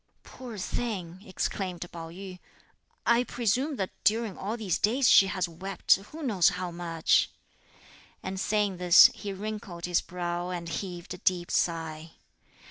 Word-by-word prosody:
"Poor 245 Hz, -4 st, -9 dB
thing!" 185 Hz, -4 st, -4 dB
exclaimed 185 Hz, -2 st, -3 dB
Pao 165 Hz, -1 st, -7 dB
yü. 185 Hz, +1 st, -9 dB, 0.7 s
"I 235 Hz, +1 st, +4 dB
presume 250 Hz, +5 st, 0 dB
that 190 Hz, -6 st, -3 dB
during 220 Hz, -2 st, +2 dB
all 210 Hz, +4 st, -4 dB
these 200 Hz, -7 st, -1 dB
days 245 Hz, +5 st, +3 dB
she 195 Hz, -, +7 dB
has 185 Hz, -1 st, -1 dB
wept 185 Hz, +4 st, +1 dB
who 300 Hz, +12 st, -10 dB
knows 205 Hz, -10 st, +4 dB
how 180 Hz, -1 st, -4 dB
much;" 170 Hz, -2 st, +1 dB, 0.9 s
and 190 Hz, 0 st, -4 dB
saying 205 Hz, -2 st, 0 dB
this 180 Hz, 0 st, +8 dB
he 205 Hz, -, -6 dB
wrinkled 195 Hz, -3 st, -6 dB
his 175 Hz, -1 st, +1 dB
brow 175 Hz, 0 st, -4 dB
and 175 Hz, -2 st, -4 dB
heaved 175 Hz, +1 st, -5 dB
a 180 Hz, -, -9 dB
deep 180 Hz, -3 st, 0 dB
sigh. 160 Hz, -1 st, -1 dB
185 Hz, 145 wpm, -28 LUFS, 175-210 Hz, 0.9 s, this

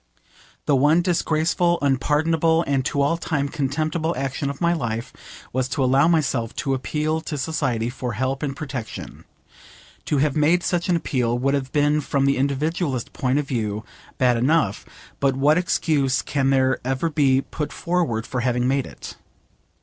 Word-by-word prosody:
The 145 Hz, -, +3 dB
one 150 Hz, +6 st, +4 dB
disgraceful, 170 Hz, 0 st, +1 dB
unpardonable, 160 Hz, +4 st, +2 dB
and 135 Hz, -2 st, +1 dB
to 140 Hz, 0 st, +1 dB
all 145 Hz, +4 st, +1 dB
time 145 Hz, -4 st, -1 dB
contemptible 155 Hz, +3 st, -1 dB
action 135 Hz, +1 st, -2 dB
of 140 Hz, -, -6 dB
my 170 Hz, -1 st, +2 dB
life 115 Hz, -5 st, -3 dB, 0.4 s
was 130 Hz, 0 st, 0 dB
to 135 Hz, -, 0 dB
allow 135 Hz, +4 st, +4 dB
myself 145 Hz, -9 st, +1 dB
to 135 Hz, -, -1 dB
appeal 155 Hz, +4 st, -1 dB
to 155 Hz, -2 st, -5 dB
society 130 Hz, -6 st, -1 dB
for 125 Hz, -1 st, -4 dB
help 130 Hz, +4 st, -2 dB
and 140 Hz, -2 st, -2 dB
protection. 130 Hz, -8 st, -7 dB, 0.8 s
To 150 Hz, -, 0 dB
have 140 Hz, 0 st, +1 dB
made 160 Hz, +4 st, +3 dB
such 175 Hz, 0 st, -1 dB
an 175 Hz, -, +4 dB
appeal 125 Hz, -7 st, 0 dB
would 135 Hz, +3 st, +1 dB
have 135 Hz, -2 st, -2 dB
been 150 Hz, 0 st, +2 dB
from 140 Hz, -1 st, 0 dB
the 140 Hz, 0 st, +2 dB
individualist 140 Hz, 0 st, -1 dB
point 130 Hz, +1 st, 0 dB
of 145 Hz, -1 st, -1 dB
view 110 Hz, -4 st, -2 dB, 0.3 s
bad 125 Hz, -2 st, +3 dB
enough, 130 Hz, -4 st, +1 dB, 0.3 s
but 135 Hz, -1 st, +2 dB
what 145 Hz, +5 st, +3 dB
excuse 145 Hz, -6 st, +1 dB
can 135 Hz, -2 st, 0 dB
there 130 Hz, -1 st, +2 dB
ever 135 Hz, +6 st, -1 dB
be 135 Hz, -3 st, +3 dB
put 150 Hz, +1 st, -5 dB
forward 170 Hz, -11 st, -1 dB
for 125 Hz, -, -3 dB
having 125 Hz, 0 st, +1 dB
made 135 Hz, 0 st, 0 dB
it? -, -, -10 dB
140 Hz, 165 wpm, -23 LUFS, 130-155 Hz, 0.8 s, one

